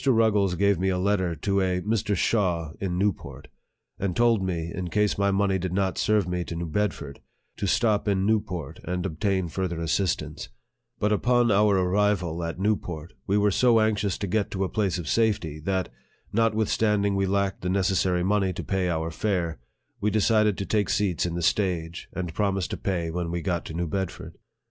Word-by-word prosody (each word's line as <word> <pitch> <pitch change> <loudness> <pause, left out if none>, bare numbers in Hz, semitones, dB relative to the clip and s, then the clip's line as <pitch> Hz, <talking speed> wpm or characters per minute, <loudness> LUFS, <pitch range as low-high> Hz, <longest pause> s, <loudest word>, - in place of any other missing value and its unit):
Ruggles 110 -7 +3
gave 100 0 +2
me 95 +1 +1
a 90 - 0
letter 95 -2 +1
to 100 +4 0
a 90 -1 +1
Mr. 105 0 0
Shaw 85 -6 0
in 90 -3 -1
Newport, 100 0 -2 0.5
and 95 -3 -1
told 115 -3 +3
me, 85 -3 -2
in 90 -1 -4
case 105 +4 +1
my 100 0 +1
money 95 -1 +1
did 90 0 -3
not 95 -1 0
serve 105 -4 +2
me 90 0 -1
to 85 - -6
New 85 +1 -3
Bedford, 80 -5 -2 0.4
to - - -2
stop 110 -3 +2
in 95 -1 +1
Newport 100 -9 -1
and 90 +1 -3
ob 80 -5 -5
tain 95 -4 +1
further 85 0 -3
assistance; 85 +2 -1 0.5
but 105 - 0
upon 120 +2 +3
our 100 0 +4
arrival 90 -3 +1
at 85 +1 -4
New 105 +3 +2
port, 85 -4 -8
we 100 - +2
were 105 0 +3
so 120 +2 +4
anxious 105 -3 +1
to 100 - -3
get 100 +2 0
to 95 0 -2
a 95 - -1
place 100 -5 0
of 85 -3 -6
safety, 100 -8 +1
that, 95 +3 -1 0.4
notwithstanding 105 -2 +2
we 95 0 +1
lacked 100 0 0
the 90 - -2
necessary 95 -1 +1
money 100 0 +2
to - - -5
pay 95 -2 0
our 80 -1 -1
fare, 85 - -1 0.4
we 105 - +1
decided 105 -1 +3
to 100 - -3
take 105 -2 0
seats 95 -4 +1
in 85 - -4
the 85 - -2
stage, 85 -2 -1
and 90 -3 -4
promise 95 -1 0
to - - -4
pay 85 -4 -2
when 85 0 -3
we 85 +1 -2
got 85 0 -2
to 80 - -7
New 85 +1 -1
Bedford. 95 +2 -4
95 Hz, 195 wpm, -26 LUFS, 90-105 Hz, 0.5 s, our